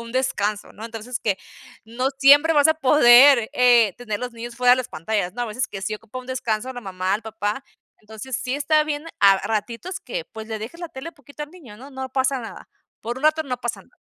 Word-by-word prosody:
un 230 0 -9
descanso, 210 -5 -1
¿no? 220 - -10
Entonces, 230 +2 -6
que, 200 -3 -1 0.5
no 245 +4 -2
siempre 290 +4 +6
vas 290 -1 +4
a 315 - +4
poder, 260 -4 +6
eh, 240 -6 +4
tener 215 -4 -4
los 250 -1 -5
niños 235 0 -8
fuera 250 0 +4
de - - +5
las 255 -2 -4
pantallas, 180 +3 -2
no, 245 - -4
a 240 - -2
veces 230 +4 -3
que 195 - -7
sí 215 +1 -2
ocupa 225 +3 -9
un 255 - -10
descanso 245 -2 -2
a 260 - -4
la 245 - -7
mamá, 190 -2 -2
el 210 - -4
papá. 220 +3 -4 0.4
Entonces 220 +4 -7
sí 255 0 -3
está 305 +1 +2
bien, 300 +1 -4
a 200 -1 +7
a - - -2
ratitos 230 - -4
que, - - -5
pues 220 0 -10
le 220 -1 -4
dejes 240 +11 -8
la 345 - -5
tele 265 +2 -8
un - - -33
poquito 285 -1 -11
al 295 - -8
niño, 295 -12 -14
¿no? 265 +5 -12
No 265 -1 -6
pasa 265 0 +1
nada, 225 - -10 0.3
por 235 +2 -5
un 265 - -7
rato 310 +1 +3
no 255 -4 -4
pasa 240 - -4
nada. - - -29
245 Hz, 245 wpm, -22 LUFS, 220-275 Hz, 0.5 s, a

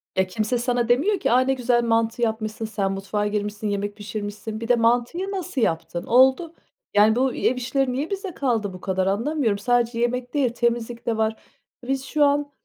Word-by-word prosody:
E, 190 0 +2
kimse 215 +4 -1
sana 240 -1 0
demiyor 360 +12 +2
ki, - - 0
aaa, 250 - +5
ne 265 +1 +2
güzel 245 -2 +1
mantı 230 0 +1
yapmışsın, 220 -1 -2
sen 200 -3 -2
mutfağa 200 +2 -2
girmişsin, 210 0 -3
yemek 205 0 -2
pişirmişsin. 210 +1 -6
Bir 230 - -4
de 245 - +5
mantıyı 245 +12 +1
nasıl 365 -8 -3
yaptın? 170 -2 -1
Oldu. 265 +7 +4 0.4
Yani, 210 +2 +5
bu 260 0 +1
ev 255 - +1
işleri 255 +1 0
niye 285 +5 -2
bize 390 -3 -4
kaldı? 225 -8 -1
Bu 180 - -10
kadar 190 0 -1
anlamıyorum. 230 +1 0
Sadece 240 +1 +1
yemek 245 +1 -1
değil, 280 -5 +2
temizlik 235 0 -1
de 230 -2 0
var. 220 0 +1 0.5
Biz 270 0 -1
şu 300 +1 +1
an, 285 0 +1
235 Hz, 190 wpm, -23 LUFS, 215-260 Hz, 0.5 s, aaa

